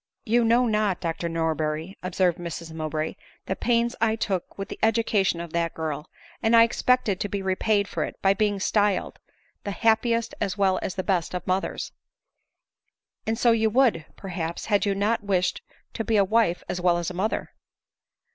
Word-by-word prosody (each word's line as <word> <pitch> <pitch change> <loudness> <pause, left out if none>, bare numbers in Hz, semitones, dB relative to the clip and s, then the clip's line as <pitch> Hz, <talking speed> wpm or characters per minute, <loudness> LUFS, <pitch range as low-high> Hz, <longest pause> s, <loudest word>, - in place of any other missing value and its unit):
" - - -52
You 240 - +5
know 235 +2 +4
not, 210 -4 +1
Dr 170 0 -3
Norberry," 160 +1 -2
observed 180 -1 +1
Mrs 170 -1 -6
Mow 155 -1 -3
bray, 155 +1 -2 0.2
" - - -32
the 190 - -2
pains 235 +2 +1
I 225 -1 +3
took 195 -5 -3
with 195 0 -4
the - - -8
education 220 -5 +2
of 170 -2 -7
that 170 0 -1
girl; 155 -2 -4 0.3
and 225 0 +4
I 230 - +9
expected 230 -4 +1
to 205 - -2
be 200 -1 -3
repaid 200 +2 +1
for - - -2
it - - -6
by 195 0 +4
being 205 0 0
styled 205 -1 +1 0.4
the - - -4
happiest 230 +2 +1
as 200 +2 -1
well 190 -2 +2
as 185 - -4
best 185 -2 -1
of 180 - -4
mothers." 185 +1 -2 0.7
" - - -50
And 225 0 0
so 240 0 +4
you 220 -1 +3
would, 220 -9 +2
perhaps, 170 -3 -5
had 205 0 +2
you 200 - +1
not 210 +4 +1
wished 190 -2 0 0.3
to 225 - -3
be 225 -1 +1
a 200 - +5
wife 210 -4 +2
as 180 - -3
well 175 -1 +3
as 175 +1 -3
mother." 195 +5 -2
195 Hz, 190 wpm, -25 LUFS, 175-220 Hz, 0.7 s, I